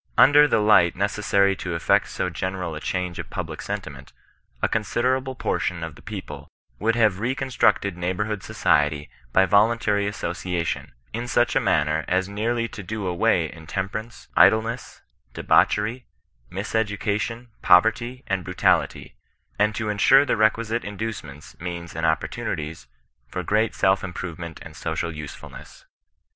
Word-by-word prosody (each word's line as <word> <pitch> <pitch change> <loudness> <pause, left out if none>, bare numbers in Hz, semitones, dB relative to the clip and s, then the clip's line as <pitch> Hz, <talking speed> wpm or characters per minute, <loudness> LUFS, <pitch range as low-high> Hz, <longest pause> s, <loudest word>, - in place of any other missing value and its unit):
Under 145 +2 +7
the - - +2
light 105 -5 +5
necessary 100 0 +2
to 90 -2 -4
effect 85 - +2
so - - -3
general 95 -3 -3
a 75 - -5
change 90 +1 -3
of - - -6
public - - -5
sentiment, - - -6 0.5
a - - +1
considerable 130 +5 0
portion 90 -8 -2
of 80 -1 -5
the - - -16
people 75 -9 -8 0.3
would 115 +1 +1
have 110 -5 +3
reconstructed 125 -5 +1
neighbourhood 95 +4 -2
society 75 0 +1 0.2
by 95 +9 +5
vo 100 +2 +5
luntary 105 -3 0
association, 90 -3 -3 0.2
in 120 +2 -3
such 120 0 +2
a - - +5
manner 75 +1 +1
as 95 +1 +1
nearly 115 +3 -1
to 100 - -8
do 105 +1 -5
away 90 -2 +1
intemperance, 95 +7 -5
idleness, 115 +3 +3 0.3
debauchery, 110 +4 +2 0.4
mis 100 +3 -5
education, 110 +2 -1
poverty, 115 +7 +3
and 95 -2 -1
brutality, 90 +1 0 0.4
and 105 +1 +2
to 110 - -2
insure 135 +7 +5
the 130 - +1
requisite 110 +2 +1
in 105 -1 -7
ducements, 75 - -6
means, 85 -2 -6
and 80 0 0
opportunities, 75 -3 -3 0.4
for - - -4
great 110 +1 +1
self 95 0 +2
im 95 -1 -5
provement 85 -2 -6
and 80 - -11
social 85 0 -3
usefulness. 75 -1 -10
100 Hz, 145 wpm, -24 LUFS, 85-110 Hz, 0.5 s, Under